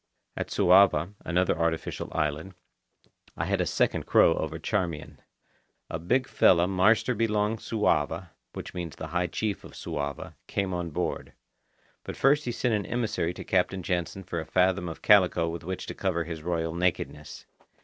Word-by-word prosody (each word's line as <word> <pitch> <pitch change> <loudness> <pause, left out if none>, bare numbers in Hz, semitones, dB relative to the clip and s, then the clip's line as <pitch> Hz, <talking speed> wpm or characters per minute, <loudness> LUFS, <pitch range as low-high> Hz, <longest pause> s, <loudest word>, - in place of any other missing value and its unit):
At - - -3
Suava, 95 0 +4
another 90 +1 +1
artificial 80 -1 -2
island, 80 +4 -2 0.8
I - - -1
had - - 0
a - - 0
second - - 0
crow 80 - +5
over 80 0 -3
Charmian. 85 -4 -3 0.7
A 80 - -3
big 125 +10 +1
fella 85 -1 +4
marster 100 +6 +3
belong 105 -1 0
Suava 110 -1 0 0.2
(which - - -7
means 85 -3 -5
the 80 - -7
high 90 +2 0
chief 105 +4 -3
of - - -12
Suava) 70 -2 -5
came 95 -2 -2
on 90 -1 -3
board. 75 - -3 0.7
But - - -7
first 145 +2 +3
he 120 - -1
sent 120 0 0
an 105 -2 -1
emissary 110 -8 -1
to - - -7
Captain 95 0 0
Jansen 90 +2 -2
for 85 - -4
a 80 - -5
fathom 90 -1 +2
of 80 - -9
calico 95 -5 +5
with 85 0 -5
which 95 +2 -5
to - - -6
cover 90 -4 -1
his 80 -1 -6
royal 80 -1 -2
nakedness. 80 -4 -2
90 Hz, 165 wpm, -27 LUFS, 80-100 Hz, 0.8 s, crow